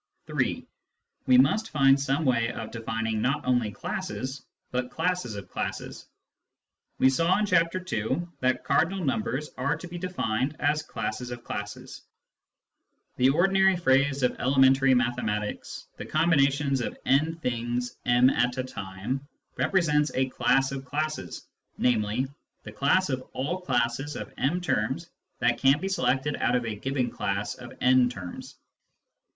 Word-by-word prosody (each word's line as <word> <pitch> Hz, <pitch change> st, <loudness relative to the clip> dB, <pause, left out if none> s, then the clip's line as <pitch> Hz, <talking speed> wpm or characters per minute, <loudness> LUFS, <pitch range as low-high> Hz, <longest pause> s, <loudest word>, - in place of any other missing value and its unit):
(3) -, -, -1 dB, 0.6 s
We 125 Hz, -, +6 dB
must 180 Hz, +13 st, +3 dB
find 135 Hz, -2 st, +4 dB
some 140 Hz, +3 st, 0 dB
way 115 Hz, -2 st, +2 dB
of 110 Hz, -1 st, -6 dB
defining 115 Hz, -1 st, -2 dB
not 140 Hz, +6 st, 0 dB
only 125 Hz, -4 st, +2 dB
classes, 180 Hz, -, -5 dB, 0.3 s
but 125 Hz, 0 st, -2 dB
classes 165 Hz, -7 st, -1 dB
of 100 Hz, -, -7 dB
classes. -, -, -5 dB, 0.9 s
We -, -, +5 dB
saw 165 Hz, +7 st, +3 dB
in 210 Hz, -, +1 dB
Chapter 180 Hz, 0 st, +1 dB
II. 110 Hz, +10 st, 0 dB, 0.2 s
that 130 Hz, 0 st, +1 dB
cardinal 170 Hz, +5 st, +1 dB
numbers 130 Hz, +3 st, -1 dB
are 140 Hz, +4 st, +1 dB
to 170 Hz, -, -9 dB
be 175 Hz, 0 st, -7 dB
defined 135 Hz, -6 st, -1 dB
as 150 Hz, +1 st, +1 dB
classes 125 Hz, -4 st, -4 dB
of 120 Hz, -1 st, -7 dB
classes. 105 Hz, 0 st, -6 dB, 1.2 s
The 130 Hz, +1 st, +5 dB
ordinary 190 Hz, +5 st, +4 dB
phrase 140 Hz, -4 st, +2 dB
of 125 Hz, -, +1 dB
elementary 135 Hz, 0 st, +4 dB
mathematics, 120 Hz, -4 st, -2 dB
" -, -, -41 dB
The -, -, -6 dB
combinations 140 Hz, -4 st, +2 dB
of -, -, -4 dB
n 155 Hz, +5 st, +2 dB
things 125 Hz, -4 st, -3 dB
m 125 Hz, +2 st, +5 dB
at 125 Hz, +1 st, +1 dB
a 130 Hz, -, 0 dB
time 110 Hz, +4 st, -5 dB
" -, -, -46 dB
represents 150 Hz, -6 st, +2 dB
a 130 Hz, 0 st, +1 dB
class 135 Hz, +1 st, +2 dB
of 135 Hz, -1 st, -5 dB
classes, 145 Hz, -, -4 dB, 0.3 s
namely, 115 Hz, +1 st, +1 dB, 0.4 s
the -, -, -8 dB
class 185 Hz, +6 st, +2 dB
of 130 Hz, -1 st, -1 dB
all 175 Hz, +8 st, -2 dB
classes 135 Hz, -3 st, -1 dB
of -, -, -7 dB
m 170 Hz, +7 st, 0 dB
terms 135 Hz, +1 st, -1 dB, 0.3 s
that 120 Hz, -1 st, +1 dB
can 135 Hz, +2 st, +4 dB
be 195 Hz, -, -3 dB
selected 135 Hz, -4 st, 0 dB
out -, -, +1 dB
of 125 Hz, -1 st, 0 dB
a 110 Hz, -, -2 dB
given 125 Hz, +3 st, -2 dB
class 100 Hz, +1 st, -2 dB
of 125 Hz, -1 st, -11 dB
n 125 Hz, -1 st, +5 dB
terms. 95 Hz, -7 st, -8 dB
130 Hz, 150 wpm, -27 LUFS, 120-155 Hz, 1.2 s, We